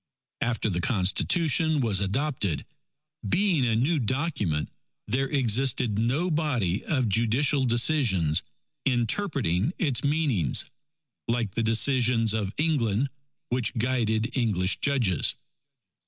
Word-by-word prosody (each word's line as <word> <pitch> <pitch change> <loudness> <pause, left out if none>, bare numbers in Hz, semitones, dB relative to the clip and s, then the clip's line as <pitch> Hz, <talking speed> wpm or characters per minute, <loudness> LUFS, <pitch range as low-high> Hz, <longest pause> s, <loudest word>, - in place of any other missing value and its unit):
After 115 -1 -1
the 90 -4 -1
Constitution 150 - +1
was 110 -7 +1
adopted, 100 - -1 0.6
being 180 -9 +2
a 115 - +1
new 145 +8 +1
Document 125 - -2 0.4
there 130 +5 0
existed 125 -4 +1
no 140 +11 0
body 125 - -1
of 130 -7 0
judicial 120 +7 +2
decisions 115 - +2 0.4
interpreting 125 - 0
its 140 -9 0
meanings, 140 - +1 0.6
like 115 -3 -1
the - - -1
decisions 115 0 +2
of 105 -3 -2
England 135 -5 0 0.4
which 125 0 -1
guided 115 -1 0
English 100 -7 +1
judges. 120 - +2
120 Hz, 105 wpm, -26 LUFS, 105-140 Hz, 0.6 s, being